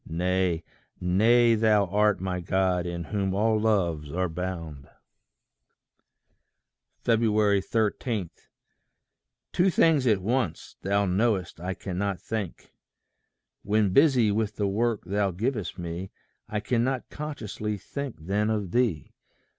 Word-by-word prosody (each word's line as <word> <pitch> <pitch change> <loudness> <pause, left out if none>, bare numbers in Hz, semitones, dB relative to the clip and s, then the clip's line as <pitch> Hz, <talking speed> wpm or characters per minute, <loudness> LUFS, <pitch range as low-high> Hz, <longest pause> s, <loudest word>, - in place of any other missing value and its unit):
Nay, 90 0 0 0.4
nay 115 +6 +4
thou 105 -2 +3
art 105 +2 +2
my 90 -1 -2
God, 90 0 0
in 85 0 -4
whom 95 +2 -2
all 110 +1 +2
loves 85 -9 0
are 90 +3 0
bound! 80 -5 -6 2.1
13. 110 -2 +1 1.2
Two 180 +2 +3
things 155 -6 +3
at 105 -4 +4
once, 105 -4 -2
thou 100 +1 +1
know'st 95 -2 0
I 90 +2 -4
cannot 95 0 -3
think. 105 -6 -5 0.9
When 105 -2 +1
busy 130 -6 +5
with 105 0 -1
the 100 - 0
work 110 +2 0
thou 100 +2 0
givest 105 +3 -3
me, 85 +2 -5 0.4
I 105 -1 -2
cannot 125 +3 -1
consciously 110 -8 -4
think 140 +6 -6
then 105 +3 +1
of 105 -5 -2
thee. 120 -10 0
100 Hz, 115 wpm, -27 LUFS, 90-110 Hz, 2.1 s, busy